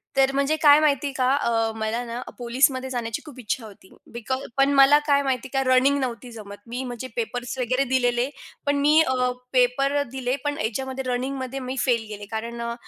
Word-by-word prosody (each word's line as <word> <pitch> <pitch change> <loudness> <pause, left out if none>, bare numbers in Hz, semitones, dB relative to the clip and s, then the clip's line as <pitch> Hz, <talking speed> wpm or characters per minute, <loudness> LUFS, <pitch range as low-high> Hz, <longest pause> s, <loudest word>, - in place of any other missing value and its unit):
तर 270 0 +4
म्हणजे 280 +3 +2
काय 290 -1 +8
माहिती 290 -2 +2
आहे 275 - -5
का 255 -1 +2
अ, 225 -5 0
मला 220 +2 -2
ना 235 +1 -5 0.2
पोलिसमध्ये 260 +2 +1
जाण्याची 230 -3 -3
खूप 280 -5 -11
इच्छा 230 +1 -3
होती. 195 -3 -15 0.2
बिकॉज 250 +3 -3 0.2
पण 275 +1 +4
मला 275 +1 +7
काय 280 -1 +4
माहिती 265 -1 -2
आहे 270 - +1
का 260 - -1
रनिंग 270 +2 +4
नव्हती 245 -1 -4
जमत. 205 -3 -10
मी 245 +3 -4
म्हणजे 245 0 -6
पेपर्स 250 - -4
वगैरे 255 +2 +1
दिलेले. 245 0 +2 0.4
पण 285 0 +2
मी 300 +2 +5
अ, 255 -4 +1 0.2
पेपर 275 +3 +2
दिले 255 -1 -2
पण 290 0 -1
ह्याच्यामध्ये 265 +4 -3
रनिंगमध्ये 260 +1 -3
मी 255 0 -5
फेल 240 -4 +1
गेले 205 -1 -7
कारण 230 +2 -4
अ, 235 0 -3
255 Hz, 195 wpm, -24 LUFS, 235-275 Hz, 0.4 s, काय